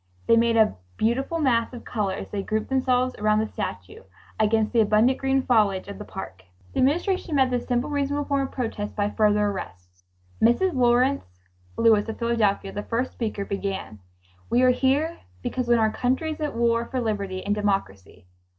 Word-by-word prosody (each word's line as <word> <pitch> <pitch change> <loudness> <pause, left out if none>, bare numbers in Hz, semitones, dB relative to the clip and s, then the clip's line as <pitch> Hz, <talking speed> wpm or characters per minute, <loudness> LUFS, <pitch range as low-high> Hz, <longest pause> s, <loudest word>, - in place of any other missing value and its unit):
They 230 - +5
made 230 0 +3
a 220 -1 +4 0.2
beautiful 265 +8 0
mass 250 -6 +1
of 240 - -9
color 200 -5 -2
as - - -7
they 205 - -2
grouped 215 +2 -2
themselves 255 -1 +1
around 215 0 +2
the 215 - +1
statue, 95 - -6 0.4
against 220 +1 +2
the 235 - +3
abundant 220 +5 +3
green 270 0 +1
foliage 205 -6 +2
of 200 - -8
the 210 - -7
park. 95 - -8 0.3
The - - -2
Administration 340 +4 +1
met 265 -2 +3
this 245 -1 -2
simple 245 0 0
reasonable 285 0 -1
form 280 -1 0
of - - -16
protest 220 -4 -4
by 205 0 0
further 210 -1 +2
arrests. 90 - -9 0.4
Mrs. 240 +12 +3
Lawrence 250 - +2 0.5
Lewis 220 -1 +4
of 225 - -5
Philadelphia, 220 -4 0
the 205 - -4
first 240 +4 -2
speaker, 215 -4 -3
began: 195 - -4 0.5
"We 245 +2 +3
are 255 - +6
here 275 +6 +1 0.2
because 255 -1 -2
when 240 0 +4
our 220 -1 +2
country 260 +8 -1
is 310 - -7
at 300 -1 -2
war 235 0 +1
for 260 +2 -3
liberty 200 -5 -3
and 205 - +1
democracy 195 - -3
230 Hz, 185 wpm, -24 LUFS, 205-260 Hz, 0.5 s, are